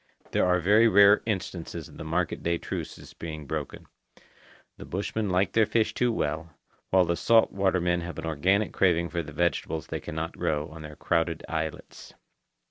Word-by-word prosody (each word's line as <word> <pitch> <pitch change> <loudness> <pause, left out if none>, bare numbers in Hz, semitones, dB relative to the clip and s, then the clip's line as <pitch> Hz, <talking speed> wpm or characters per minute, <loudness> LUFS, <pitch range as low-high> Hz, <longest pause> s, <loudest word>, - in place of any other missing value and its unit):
There - - +2
are 90 0 +3
very 105 +6 +5
rare 100 -1 +6
instances 95 -5 -4
of - - -15
the - - -6
market 85 +2 -1
day 85 0 0
truces - - -7
being 80 -2 -7
broken. 75 +1 -5 0.9
The - - -9
bushmen 100 +2 -2
like 90 0 +1
their 110 -2 +4
fish 115 -2 +1
too 125 -1 +1
well, 80 -4 -2 0.4
while 95 -1 +4
the 85 0 0
salt 115 +7 +4
water 95 -1 +1
men 85 0 0
have 85 -2 -7
an - - -5
organic 95 +7 +1
craving 85 -2 +2
for 85 - -2
the 75 - -9
vegetables 80 0 -1
they - - -4
cannot 80 +2 -5
grow 75 +1 -1
on 80 0 -10
their 75 -1 -9
crowded 85 0 -1
islets. 80 -1 -5
85 Hz, 180 wpm, -27 LUFS, 80-95 Hz, 0.9 s, rare